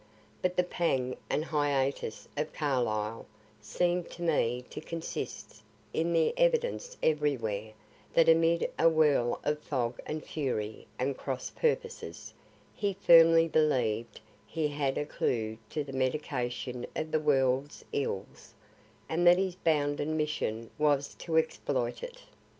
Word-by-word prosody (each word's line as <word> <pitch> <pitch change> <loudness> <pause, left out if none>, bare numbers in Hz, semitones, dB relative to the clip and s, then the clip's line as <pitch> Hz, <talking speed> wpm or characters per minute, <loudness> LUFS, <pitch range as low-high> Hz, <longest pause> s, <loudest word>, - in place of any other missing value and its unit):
But 180 0 0
the 180 - +5
pang 135 -8 0
and 155 - 0
hiatus 140 -6 -1
of 150 +1 -2
Carlyle 115 -7 -1 0.3
seem 175 +11 0
to 175 - -9
me 125 -7 +1
to - - -6
consist 165 +1 -6 0.3
in 165 +1 0
the 165 -1 +3
evidence - - +1
everywhere 115 -9 0 0.4
that 165 - +6
amid 165 +1 +4
a 165 - +6
whirl 150 -7 +3
of 150 0 0
fog 125 -5 -2
and 155 0 -4
fury 110 -8 -3
and 135 +2 -1
cross 130 -1 -4
purposes, 470 0 -2 0.4
he 200 -1 -1
firmly 165 -3 +7
believ'd 125 -8 +1 0.3
he 155 -2 -1
had 145 -2 -1
a 150 - -1
clue 110 -6 -1
to 150 - -2
the 135 -1 -9
medication 130 -2 -2
of 155 0 -3
the 155 - +2
world's 135 -1 +1
ills, 100 -9 -4 0.5
and 175 +2 +1
that 175 +1 +8
his 190 -1 0
bounden 150 -3 0
mission 115 -7 -2
was 145 -2 +2
to 160 -2 -1
exploit 160 - 0
it. - - -8
150 Hz, 135 wpm, -30 LUFS, 125-165 Hz, 0.5 s, that